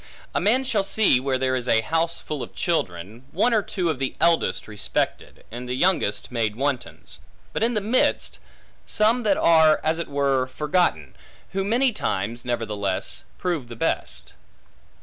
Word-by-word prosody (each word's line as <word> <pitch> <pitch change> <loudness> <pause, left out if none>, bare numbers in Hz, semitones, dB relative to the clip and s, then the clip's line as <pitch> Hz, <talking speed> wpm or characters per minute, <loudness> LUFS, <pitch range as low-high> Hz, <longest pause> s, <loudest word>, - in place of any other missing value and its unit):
A - - 0
man 245 +6 +3
shall 240 -6 +1
see, 195 -8 +3
where 130 0 0
there 130 0 0
is 125 -1 -3
a 115 - +4
house 165 +7 -1
full 150 -3 -5
of - - -8
children, 110 - -2
one 220 +9 +2
or 220 - +4
two 185 -3 -3
of 140 - -5
the 135 -1 -2
eldest 165 - +2
respected, 105 -2 -3
and 125 +2 -7
the 125 - -1
youngest 130 - +1
made 110 -3 -1
wantons; 125 - -4 0.3
but - - -2
in 235 +1 +2
the 210 - +1
midst, 225 +6 +1 0.5
some 225 +3 +2
that 210 -4 +2
are 160 -2 +5
as 160 +1 +1
it 170 - -3
were 140 -2 +1
forgotten, 145 - 0 0.4
who 195 0 -1
many 240 +5 +2
times, 115 - -2
nevertheless, 105 -5 -2
prove 170 -9 -2
the 120 - -9
best. - - -3
140 Hz, 170 wpm, -24 LUFS, 115-190 Hz, 0.5 s, are